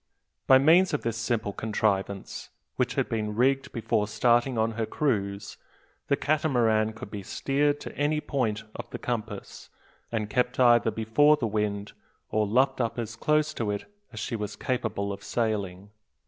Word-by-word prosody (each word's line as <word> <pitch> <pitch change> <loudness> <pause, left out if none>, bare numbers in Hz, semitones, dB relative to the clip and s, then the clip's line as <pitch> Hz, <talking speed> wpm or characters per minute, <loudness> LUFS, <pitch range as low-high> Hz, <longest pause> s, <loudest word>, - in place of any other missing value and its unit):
By 130 - +8
means 160 +5 +5
of - - -4
this 115 -1 -1
simple 115 -3 -1
contrivance, 100 -3 -2 0.3
which - - 0
had - - +1
been 105 -2 -2
rigged 135 +3 +2
before 110 -2 0
starting 120 +3 +2
on 110 +1 +1
her 110 0 -3
cruise, 100 -8 -2 0.5
the 140 - +3
Catamaran 120 -8 +1
could 110 - -9
be 105 - -5
steered 145 +8 0
to - - -8
any 150 +1 +1
point 115 -8 -1
of - - -8
the - - -5
compass, 115 -4 -5 0.4
and 110 -2 -1
kept 125 +4 0
either 120 -2 +5
before 115 +8 +3
the 130 - -2
wind, 105 -1 -2 0.4
or 110 -1 +1
luffed 130 +5 +2
up 115 0 -2
as 115 -1 -4
close 150 +5 +1
to 115 -7 -2
it 100 0 -3 0.3
as 110 - -7
she 115 - -3
was 105 -2 -4
capable 110 -5 -2
of 100 - -10
sailing. 100 -4 -2
115 Hz, 165 wpm, -27 LUFS, 105-130 Hz, 0.5 s, By